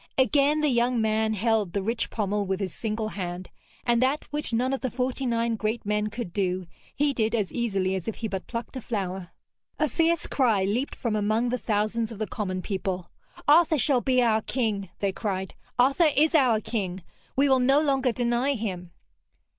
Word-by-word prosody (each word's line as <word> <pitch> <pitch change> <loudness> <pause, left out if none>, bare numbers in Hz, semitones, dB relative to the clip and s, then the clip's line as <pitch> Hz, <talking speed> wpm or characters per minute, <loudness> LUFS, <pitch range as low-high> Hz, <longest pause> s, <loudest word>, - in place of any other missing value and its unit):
Again 285 +3 +3
the 300 - +3
young 240 -1 +2
man 220 0 +1
held 215 -3 +1
the 200 - -1
rich 230 +3 -1
pommel 205 -2 -1
with 190 0 -1
his 190 -4 -3
single 220 -1 -3
hand, 180 -2 -5 0.3
and 235 0 +3
that 270 +4 +1
which 295 -2 -3
none 250 +3 +1
of 270 - -2
the 260 - -1
forty 255 +2 -2
nine 230 -1 +1
great 220 +1 -2
men 210 0 0
could 215 -4 -6
do, 185 -2 -1 0.3
he 290 0 +2
did 220 -2 0
as 210 -4 -1
easily 195 -6 0
as 190 -3 -4
if 225 - -2
he 225 - -4
but 190 -2 -5
plucked 235 +2 -5
a 260 - -4
flower. 190 -5 -4 0.5
A 305 - +2
fierce 330 +2 +2
cry 225 -8 +2
leaped 225 +8 -1
from 230 -4 -2
among 215 +3 +1
the 250 - 0
thousands 215 +1 0
of 225 - -7
the 215 - -2
common 185 -2 -4
people. 190 -3 -3 0.4
'Arthur 315 +2 +5
shall 255 0 +3
be 255 -1 +3
our 220 -2 +3
King!' 215 -6 -1
they 200 -1 +1
cried. 190 -2 -3 0.2
'Arthur 275 +6 +4
is 310 +4 +4
our 255 -8 +4
King! 190 -5 -3 0.3
We 280 +2 +4
will 265 -1 +4
no 270 +3 +4
longer 270 -4 +2
deny 240 +4 +1
him!' 185 -6 -4
225 Hz, 195 wpm, -26 LUFS, 200-255 Hz, 0.5 s, Arthur